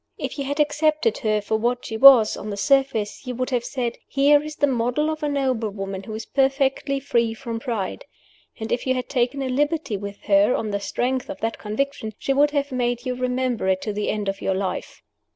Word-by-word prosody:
If - - -5
you 280 - -2
had 285 +2 -3
accepted 305 +6 +2
her 215 -3 +1
for 220 +2 -1
what 240 +2 -1
she 220 - -5
was, 245 -2 +8
on 210 - -7
the 200 - -4
surface, 265 -2 +1
you 250 - -3
would 255 +2 -2
have 245 -2 0
said, 245 -2 -3
Here 285 +1 +4
is 305 0 -7
the 285 - +2
model 260 +4 0
of 310 - -5
a 300 - 0
noble 260 -6 0
woman 195 -1 -5
who 215 +2 -7
is 220 - -6
perfectly 270 +1 +1
free 235 -4 0
from 230 -1 -5
pride. 230 - -4 0.5
And 220 0 -5
if 245 - -1
you 260 - +2
had 255 - -4
taken 255 +1 0
a - - -2
liberty 290 -3 0
with 200 0 -8
her, 200 +2 +4
on 215 - -2
the 200 - -1
strength 250 +6 -2
of 290 0 -6
that 225 0 -2
conviction, 220 +1 -3
she 275 - -1
would 290 +2 +4
have 285 -1 -1
made 245 -1 -1
you 255 - -1
remember 250 -3 -1
it 190 0 +1
to 210 - -3
the 210 0 -2
end 210 -1 -2
of 195 0 -3
your 190 - 0
life. 190 0 -4
250 Hz, 225 wpm, -23 LUFS, 215-275 Hz, 0.5 s, was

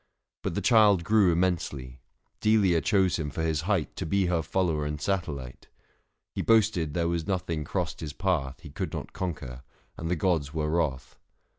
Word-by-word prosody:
But - - -3
the 100 - -1
child 105 -4 +5
grew 105 -2 +4
605 - - 0
Immensely; 75 -8 -1 0.4
Delia 100 -6 +3
chose 95 -3 +2
him 75 -2 -2
for 80 - -3
his 80 -2 0
height 90 -2 -1
To - - -3
be 100 +3 +2
her 85 -2 +1
follower 80 -3 0
and 75 0 -3
satellite. 75 - -3 0.7
He - - -2
boasted 105 -9 +2
there 85 -1 +1
was 85 -1 -2
nothing 85 -5 -1
crossed - - -3
his 75 -2 -5
path 75 -6 -1
He 75 - -10
could - - -4
not - - -6
conquer, 65 -9 -5 0.4
and 80 - -4
the 90 - +2
gods 80 -4 0
were 75 -1 -1
wrath. 75 -6 -2
85 Hz, 180 wpm, -28 LUFS, 75-95 Hz, 0.7 s, child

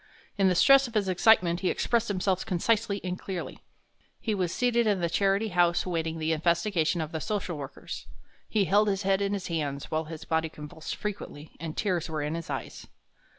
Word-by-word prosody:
In 195 -1 +3
the 185 - +3
stress 275 +8 +6
of 235 - -12
his 205 -2 +2
excitement 185 -2 +4
he 185 - 0
expressed 235 -1 +1
himself 190 -1 0
concisely 205 +2 0
and 180 0 -3
clearly. 185 -3 -5 0.6
He 220 - -1
was 185 -4 0
seated 235 0 +2
in 205 -3 +2
the 170 -1 -1
Charity 200 +4 +2
House 175 -2 +2
awaiting 165 -2 -2
the 160 0 -1
investigation 170 +1 +1
of 155 0 -4
the 160 - -4
social 205 -5 -2
workers. 140 -2 -7 0.4
He 210 -3 +2
held 205 +3 +4
his 195 0 0
head 195 0 +2
in 200 0 0
his 195 -2 -3
hands, 145 -4 -3
while 160 0 0
his 160 0 -8
body 160 0 0
convulsed 150 +1 -7
frequently, 190 -7 -6
and 160 -2 -6
tears 180 -4 0
were 155 -2 -2
in 150 +1 -2
his 165 -1 -5
eyes. 135 -4 -5
180 Hz, 195 wpm, -28 LUFS, 160-205 Hz, 0.6 s, stress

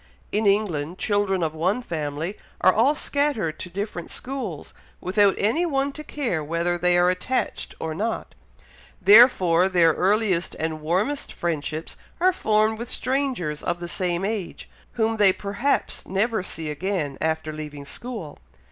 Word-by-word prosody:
In 215 0 +1
England, 180 -5 +1
children 200 -3 +1
of 155 -1 -1
one 185 +10 0
family 155 +1 -3 0.3
are 185 - +6
all 255 +8 +3
scattered 285 - -1
to 185 - -6
different 190 -2 -5
schools, 250 - -5 0.3
without 195 +2 +3
any 230 +12 +1
one 280 -4 0
to 305 +2 -8
care 240 - -2
whether 170 +3 0
they 175 0 +2
are 175 +1 +4
attached 255 +8 -2
or 160 -1 -3
not, 220 +7 -3 0.7
therefore 190 -4 +6
their 170 -3 +4
earliest 190 -1 +1
and 160 -1 -3
warmest 195 - -1
friendships 160 -1 -3 0.2
are 370 +2 +4
formed 215 -5 +1
with 235 - -5
strangers 255 - -1
of 175 0 -2
the 175 - -5
same 175 +1 -1
age, 205 -4 -4 0.3
whom 225 -1 0
they 205 -2 +6
perhaps 205 +9 -1
never 210 +3 0
see 160 -4 -4
again, 160 -3 -2
after 160 -1 -1
leaving 150 -2 -7
school. 210 - -7
190 Hz, 145 wpm, -24 LUFS, 165-220 Hz, 0.7 s, are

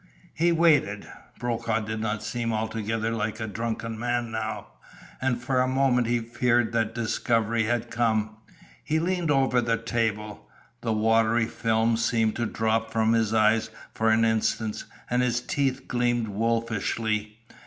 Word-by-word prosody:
He 170 +2 +2
waited. 155 -11 +3 0.3
Brokaw 115 -2 -1
did 110 +1 -4
not 105 -1 -2
seem 115 +1 -2
altogether 110 0 -2
like 110 -1 -2
a 110 - -2
drunken 115 +1 -4
man 120 -1 -1
now, 110 -2 -3 0.6
and 130 -2 0
for 125 +1 +1
a 130 - +2
moment 130 -2 +2
he 120 +1 +2
feared 120 0 +1
that 115 -2 0
discovery 115 -1 0
had 120 +1 -1
come. 110 -2 0 0.5
He 155 - 0
leaned 175 0 0
over 135 -3 +3
the 115 -1 +1
table. 110 -3 -3 0.3
The 115 - -1
watery 115 +1 +3
film 115 0 +1
seemed 115 -1 +1
to 120 -1 0
drop 110 0 0
from 110 0 +2
his 115 -2 +2
eyes 110 0 +3 0.2
for 110 0 +1
an 110 +1 +4
instant 110 -1 0 0.2
and 125 +1 +1
his 120 -1 +1
teeth 135 +1 -2
gleamed 120 -2 0
wolfishly. 110 0 -1
115 Hz, 150 wpm, -26 LUFS, 110-120 Hz, 0.6 s, an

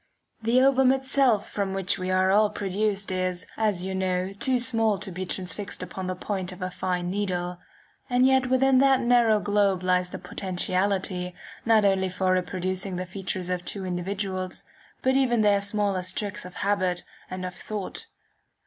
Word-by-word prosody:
The 230 +3 +3
ovum 265 -1 +5
itself 265 -5 +2
from 195 -2 -2
which 195 0 0
we 185 0 -3
are 185 0 +3
all 210 +1 +4
produced 200 0 -1
is, 185 -1 -2
as 205 -5 0
you 190 - -3
know, 185 0 -1
too 255 +6 +1
small 225 -4 +3
to 195 0 -5
be 185 +1 -5
transfixed 185 +2 -4
upon 190 -1 -6
the 185 - -2
point 190 0 -3
of 185 - -10
a 185 - -3
fine 180 -1 -2
needle; 180 -3 -2 0.5
and 250 +1 +4
yet 265 -1 +4
within 260 0 +4
that 270 -1 +5
narrow 235 -3 +4
globe 200 -3 +1
lies 180 0 +1
the - - -6
potentiality, 185 0 -2 0.3
not 220 -2 +4
only 190 -1 +2
for 185 0 +1
reproducing 185 +1 -2
the 180 +1 -3
features 185 -1 -4
of 180 -1 -2
two 190 +1 -3
individuals, 185 +1 -3 0.4
but 260 0 +3
even 245 -4 +3
their 205 -1 +4
smallest 200 -3 0
tricks 210 -2 -3
of 180 - -10
habit 185 -3 +1 0.3
and 185 0 -5
of 180 - -5
thought. 205 +1 -6
195 Hz, 170 wpm, -26 LUFS, 185-215 Hz, 0.5 s, ovum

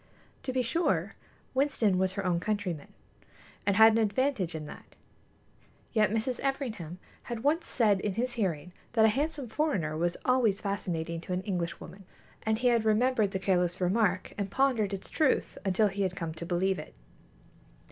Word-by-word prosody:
To 260 - -3
be 255 0 +1
sure, 330 +9 0 0.4
Winston 260 -8 +2
was 190 0 +1
her 200 -1 -3
own 175 -2 +2
countryman, 190 -6 -3 0.8
and 200 - +3
had 220 +2 +8
an 220 - +1
advantage 220 - 0
in 155 -1 -5
that; - - -12 1.0
yet 215 -2 +4
Mrs. 225 +3 -1
Everingham 225 - -3 0.3
had 235 -1 -5
once 320 +4 +1
said 210 -5 +3
in 195 -1 -2
his 245 +2 -1
hearing 180 -6 -2 0.2
that 220 -2 +5
a - - +6
handsome 285 +3 -1
foreigner 215 - -1
was 170 +2 0
always 245 -6 +3
fascinating 170 -5 -3
to 180 - -5
an 180 +1 -2
Englishwoman, 180 0 -4 0.4
and 220 0 0
he 245 +2 +3
had 235 -2 +3
remembered 220 0 +3
the 190 - -2
careless 180 -2 +1
remark 185 0 +1
and 200 -1 -1
pondered 240 -5 +2
its 195 -1 -5
truth 305 -4 +1
until 200 +2 +3
he 200 0 -3
had 185 -2 0
come 165 -3 -4
to 165 +1 -7
believe 185 +1 +1
it. 150 - -10
205 Hz, 170 wpm, -29 LUFS, 180-240 Hz, 1.0 s, had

